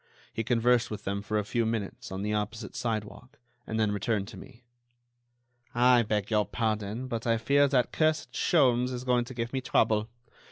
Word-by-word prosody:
He 115 - -2
conversed 120 +1 +2
with 105 - -6
them 100 +1 -2
for 105 +1 -2
a 105 - -1
few 115 +2 0
minutes 110 -4 -3
on 95 +1 -4
the 105 +1 -1
opposite 105 0 -3
sidewalk, 115 +5 -4 0.3
and 110 - -2
then 110 -2 +2
returned 105 0 -1
to - - -10
me. 125 -2 -13 1.1
"I 125 0 +5
beg 105 -1 -1
your 105 -1 +2
pardon, 110 +1 -2
but 115 -2 -4
I 115 -1 +3
fear 140 +5 +3
that 130 -3 +1
cursed 155 -1 +1
Sholmes 125 -6 +3
is 125 0 -5
going 125 -1 +2
to 130 +1 -10
give 120 +1 -3
me 135 - -1
trouble. 110 -3 +1
115 Hz, 190 wpm, -28 LUFS, 105-125 Hz, 1.1 s, I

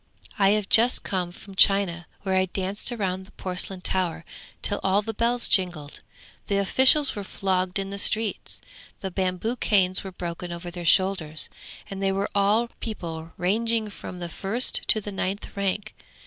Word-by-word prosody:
I 195 -1 +5
have 210 -2 -3
just 235 +4 +5
come 180 -3 -2
from 195 +2 -13
China, 190 -3 +3 0.2
where 190 -1 -1
I 185 0 +3
danced 190 +4 -2
round 190 -5 -3
the - - -19
porcelain 185 0 -4
tower 180 -3 0 0.4
till 205 - +2
all 195 +2 +2
the 225 +1 -4
bells 235 +2 +2
jingled. 175 -6 0 0.5
The 200 - +1
officials 265 +8 +4
were 205 - -4
flogged 185 -1 -1
in 195 0 -3
the 200 - -2
streets, 215 0 +1 0.4
the 190 - -4
bamboo 185 +6 -1
canes 185 -5 +2
were 190 - -7
broken 175 -1 -6
over 170 +1 -6
their 175 0 -6
shoulders, 180 -5 +1 0.4
and 195 0 -6
they 195 0 +2
were 195 +1 -1
all 210 +4 +2
people 165 -7 -6
ranging 220 +3 0
from 185 - -8
the 175 -1 -5
first 205 +8 +3
to 215 - +5
the 205 - -6
ninth 195 +1 -4
rank. 200 +2 -2
195 Hz, 170 wpm, -25 LUFS, 180-205 Hz, 0.5 s, I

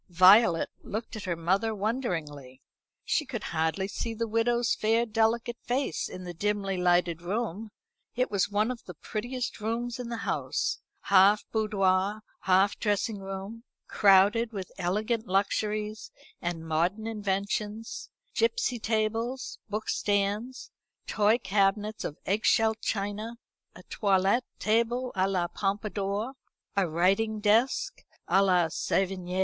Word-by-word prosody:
Violet 185 0 +6
looked 220 +2 -5
at 215 - -6
her 175 -2 -1
mother 190 +7 0
wonderingly. 165 - -3 0.5
She - - +1
could 250 -6 -6
hardly 160 +4 0
see 225 +3 -4
the 230 +1 -2
widow's 230 +2 +1
fair 225 +2 +2
delicate 225 +1 0
face 250 - -1
in 185 - -8
the 175 -1 -6
dimly 200 +2 -1
lighted 175 -2 +2
room. 210 +2 -3 0.5
It 250 -1 0
was 200 -1 +1
one 210 +4 +1
of 245 - -7
the - - -9
prettiest 245 +3 -4
rooms 235 +3 -2
in 245 -1 -5
the 235 - -3
house - - -1 0.2
half 200 +2 +5
boudoir 205 -1 +1 0.2
half 190 +2 +3
dressing 205 0 0
room, 195 +4 -7 0.2
crowded 205 +4 +4
with 190 -3 -6
elegant 215 +6 -1
luxuries 210 +2 -1 0.3
and 170 -2 -4
modern 175 +7 0
inventions, 210 +1 -3 0.2
gipsy 455 - +1
tables, 225 +4 -2
book 210 +1 -3
stands, 205 +5 -1 0.3
toy 215 +2 +3
cabinets 205 +1 0
of 150 - -5
egg 205 +3 0
shell 220 0 +4
china, 215 +1 -3 0.4
a - - -12
toilet 200 +3 +2
table 235 +3 +1
à 190 +1 +1
la 180 -2 0
Pompadour, 205 +4 -2 0.4
a 195 -4 +2
writing 195 +7 +1
desk 220 +5 +2 0.3
à 195 - +4
la 180 -3 +4
Sevigné. 185 +2 -1
210 Hz, 130 wpm, -28 LUFS, 190-225 Hz, 0.5 s, Violet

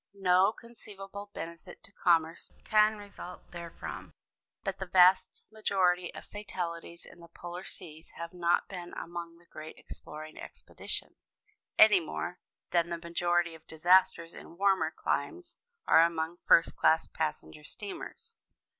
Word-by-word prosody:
No 190 +1 +4
conceivable 205 -4 -10
benefit 170 -2 -9
to - - -14
commerce 165 -4 +1
can 215 0 +4
result 200 -3 -10
therefrom. 170 -1 -8 0.5
But 195 -2 -3
the 190 - -4
vast 185 +1 +5
majority 180 -5 +1
of - - -9
fatalities 170 -4 -6
in - - -15
the 170 - -13
polar 175 +2 -8
seas 160 -4 -10
have 170 +1 -6
not 175 -1 +1
been 175 -3 -8
among 170 0 -7
the 170 - -23
great 155 -1 -10
exploring 155 +1 -10
expeditions, - - -7 0.4
any 215 -3 +8
more 175 +2 -5 0.3
than 170 -1 +2
the 170 - -2
majority 170 0 0
of 160 -1 -15
disasters 170 0 +3
in 170 - -12
warmer 195 0 +3
climes 345 -1 -3 0.3
are 160 - +7
among 165 0 0
first 165 - +5
class 160 +1 +3
passenger 155 -1 -4
steamers. 455 - -9
175 Hz, 135 wpm, -30 LUFS, 170-195 Hz, 0.5 s, any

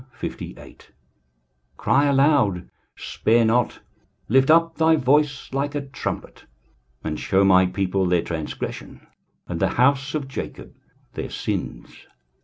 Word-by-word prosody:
23:058:001 - - -8 1.0
Cry 140 +1 +2
aloud, 135 - +2 0.3
spare 115 +1 +1
not, 120 +2 +1 0.5
lift 130 +4 +4
up 165 +1 +4
thy 160 0 +4
voice 145 0 +1
like 140 +2 -2
a 145 - -1
trumpet, 135 -2 -6 0.6
and 75 -1 -3
shew 95 0 +2
my 95 -1 +5
people 95 0 -1
their 90 -1 +2
transgression, 80 -3 -6 0.4
and - - -4
the - - +2
house 135 +3 +2
of 145 -3 -3
Jacob 135 - -7 0.4
their - - -5
sins. - - -5
130 Hz, 120 wpm, -23 LUFS, 95-145 Hz, 1.0 s, my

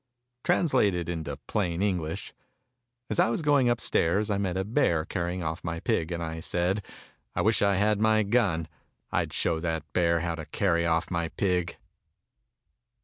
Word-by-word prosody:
TRANSLATED 105 - +2
INTO 80 -4 -4
PLAIN 90 -3 -1
ENGLISH 90 -6 -2 0.8
As 105 - 0
I - - +5
was 120 +7 -1
going 140 -4 +4
upstairs 105 -3 +1
I 100 - +1
met 95 -2 -1
a 95 - 0
bear 95 - +1
carry 85 -1 -2
ing 90 - -4
off 80 +1 -3
my 85 -1 -3
pig; 80 0 0
and 85 -1 -2
I 80 0 -4
said, 90 +5 -1 0.5
"I - - +1
wish 110 +1 +3
I 100 -1 +3
had 105 +2 +2
my 110 0 +4
gun 100 -7 +1 0.2
— - - -47
I'd - - 0
show 80 - 0
that 80 -2 -2
bear 85 -2 +2
how 85 -1 -1
to 80 -2 -7
carry 85 -4 +1
off 80 +1 0
my 85 -1 0
pig!" 90 0 -1
90 Hz, 175 wpm, -28 LUFS, 85-105 Hz, 0.8 s, I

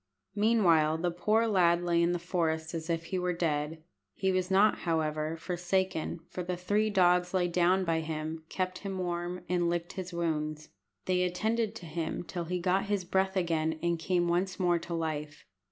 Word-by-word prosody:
Meanwhile 185 -8 +3
the 175 +1 0
poor 215 +6 +2
lad 175 -5 +3
lay 170 -1 +2
in 170 +1 +3
the 175 - 0
forest 165 -2 -1
as 165 0 -5
if 165 0 0
he 185 +2 -3
were 180 0 0
dead. 155 -2 -1 0.3
He 190 - +1
was 185 0 0
not, 200 +3 +4
however, 155 -1 -1
forsaken, 180 -1 -1
for 180 +1 -5
the 180 0 -3
three 205 +4 +1
dogs 180 -2 +3
lay 180 -1 +2
down 180 +2 +2
by 165 -1 +1
him, 160 0 -4
kept 185 -1 -2
him 195 -1 -5
warm, 175 0 -3
and 175 -1 +1
licked 175 0 -2
his 185 -1 -5
wounds. 155 -3 -2 0.4
They 180 -1 +2
attended 220 +5 0
to 180 - -8
him 160 +1 -3
till 175 0 -5
he 180 +2 -2
got 185 +3 +1
his 200 -3 -1
breath 190 +1 +1
again, 160 -3 0
and 170 -1 +1
came 175 +1 +1
once 180 +2 0
more 175 -2 +3
to 170 +1 -5
life. 150 -2 -4
175 Hz, 185 wpm, -30 LUFS, 165-185 Hz, 0.4 s, not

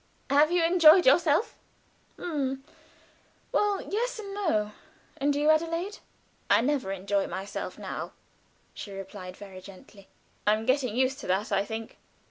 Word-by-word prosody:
Have 295 +3 +5
you 350 -1 +3
enjoyed 335 0 +7
yourself?" 300 - +3 0.6
"H'm 270 -5 -3 0.9
well 410 -2 +1
yes 485 +4 -2
and 400 -2 -7
no. 220 - 0 0.5
And 285 +1 +1
you, 295 +2 +4
Adelaide?" 335 +5 -1 0.5
"I - - +5
never 260 -5 0
enjoy 195 +1 -1
myself 190 +3 -5
now," - - -6 0.6
she 205 - -8
replied, 195 -1 -8
very 195 -2 -10
gently. 195 +1 -15 0.4
"I 210 - +5
am 220 +1 -5
getting 255 -3 +1
used 260 +2 +1
to - - -8
that, 190 +4 0
I 195 0 +2
think." 220 +1 -7
270 Hz, 140 wpm, -28 LUFS, 200-330 Hz, 0.9 s, enjoyed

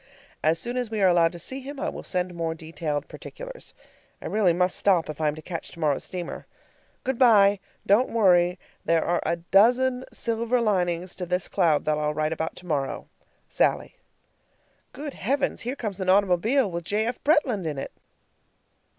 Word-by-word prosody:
As 160 +1 +3
soon 240 +8 -3
as 245 -3 -2
we 220 -1 -3
are - - +6
allowed 170 -2 +4
to - - -8
see 260 +10 -5
him 280 +1 -8
I - - -2
will - - -5
send 180 -1 -2
more 165 -1 -3
detailed 160 -2 -4
particulars. - - -10 0.4
I - - -11
really 210 -4 +2
must 180 +1 +1
stop 180 -6 +2
if 155 - -9
I 155 - +2
am 150 - 0
to 155 - -10
catch 170 -3 -6
tomorrow's 150 -4 -1
steamer. 180 -2 -6 0.6
Good 260 -2 -2
by. 205 -5 +6 0.3
Don't 215 +6 +4
worry. 180 -5 +4 0.3
There 165 -1 +2
are 175 0 +1
a - - 0
dozen 245 +9 +3
silver 235 +1 -1
linings 180 -5 0
to 180 -1 -4
this 180 +1 -1
cloud 165 -6 +2
that 150 0 +1
I'll 150 0 -1
write 155 +1 0
about 160 0 -4
tomorrow. 150 -7 -3 0.4
SALLIE. - - 0 1.0
Good 290 -1 -7
heavens! 275 +7 -1
here 245 +3 -3
comes 205 -7 -5
an 185 - -1
automobile 200 +5 +3
with 170 0 -4
J. 210 +4 0
F. 240 +2 -4
Bretland 260 - +2
in 150 -2 -3
it! 135 - -5
185 Hz, 180 wpm, -25 LUFS, 165-230 Hz, 1.0 s, are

